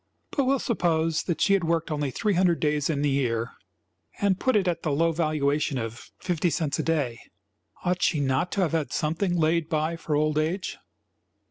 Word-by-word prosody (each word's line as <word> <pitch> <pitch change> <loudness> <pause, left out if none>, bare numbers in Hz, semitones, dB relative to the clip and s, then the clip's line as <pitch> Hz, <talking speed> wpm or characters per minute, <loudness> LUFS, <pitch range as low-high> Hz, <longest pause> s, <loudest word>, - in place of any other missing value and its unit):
But 275 - +1
we 265 - +3
will - - +2
suppose 165 -9 0
that 170 - -2
she 200 - +4
had 195 -3 +2
worked 165 0 0
only 145 -2 -1
three 210 - 0
hundred 175 -2 +3
days 150 -1 0
in 145 -2 0
the 145 - +2
year 120 -4 0 0.7
and 200 -2 +2
put 260 -2 +1
it 195 -3 +2
at 170 -2 0
the 155 - -1
low 165 +4 +2
valuation 150 -3 0
of 115 0 -6
fifty 175 -1 0
cents 155 -1 -1
a - - +1
day, 145 -8 -1 0.7
ought 180 0 0
she 155 - +2
not 140 +5 0
to 200 - 0
have 175 - +1
had 160 -3 -1
something 175 +4 0
laid 165 0 +1
by 155 +1 0
for 160 -2 -2
old 155 0 +2
age? 175 +5 -2
160 Hz, 205 wpm, -26 LUFS, 150-175 Hz, 0.7 s, she